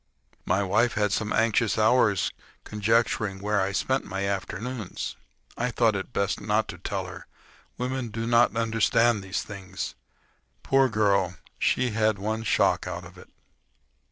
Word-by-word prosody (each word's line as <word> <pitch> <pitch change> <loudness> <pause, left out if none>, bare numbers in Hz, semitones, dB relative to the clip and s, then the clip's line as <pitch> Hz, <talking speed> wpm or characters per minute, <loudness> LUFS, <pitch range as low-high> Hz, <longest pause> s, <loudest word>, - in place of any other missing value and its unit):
My 100 - +2
wife 115 +5 +2
had 105 -2 +1
some 105 +1 -1
anxious 115 -1 +2
hours 110 -3 +3
in - - -32 0.2
conjecturing 110 -1 +1
where 105 0 +1
I 95 +1 0
spent 130 +7 0
my 95 +1 -3
afternoons. 100 +3 -4 0.4
I 125 +1 -1
thought 115 -3 +2
it 95 +4 -4
best 100 -2 -1
not 105 +1 +1
to - - -7
tell - - -3
her; - - -10 0.5
women 130 0 -2
do 115 +1 -4
not 120 0 +4
understand 115 0 +2
these 95 0 -3
things. 95 -2 -6 0.7
Poor 135 -1 +3
girl!—she 105 +3 0
had 110 -1 +2
one 110 +3 -2
shock 110 - +2
out - - -5
of - - -13
it. - - -15
110 Hz, 150 wpm, -26 LUFS, 100-115 Hz, 0.7 s, not